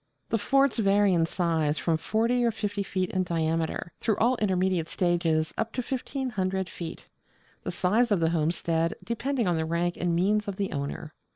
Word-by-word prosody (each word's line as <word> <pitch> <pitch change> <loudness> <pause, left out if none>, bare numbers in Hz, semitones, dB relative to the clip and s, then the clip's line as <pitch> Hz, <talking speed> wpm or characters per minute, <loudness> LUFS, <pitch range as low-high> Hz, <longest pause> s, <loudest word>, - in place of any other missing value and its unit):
The 225 - +1
forts 275 +3 +2
vary 200 -1 +4
in 165 -2 +2
size 160 -4 0
from 165 - +1
40 230 +8 +1
or 235 - +4
50 205 -2 -3
feet 185 -2 -2
in 185 - +1
diameter, 165 -1 -1
through 220 -3 0
all 245 +3 +3
intermediate 185 -5 +1
stages 170 -3 +1
up 225 - -1
to 250 - -2
1,500 210 -8 -2
feet: 170 -2 -7 0.6
the - - -4
size 220 +7 +2
of 200 - +3
the 165 0 +2
homestead 165 0 0
depending 235 0 -1
on 175 -2 +2
the 160 - 0
rank 170 +2 -1
and 175 -1 0
means 205 +4 +2
of 200 - -3
the 195 0 -2
owner. 145 +2 -4
185 Hz, 180 wpm, -27 LUFS, 165-215 Hz, 0.6 s, vary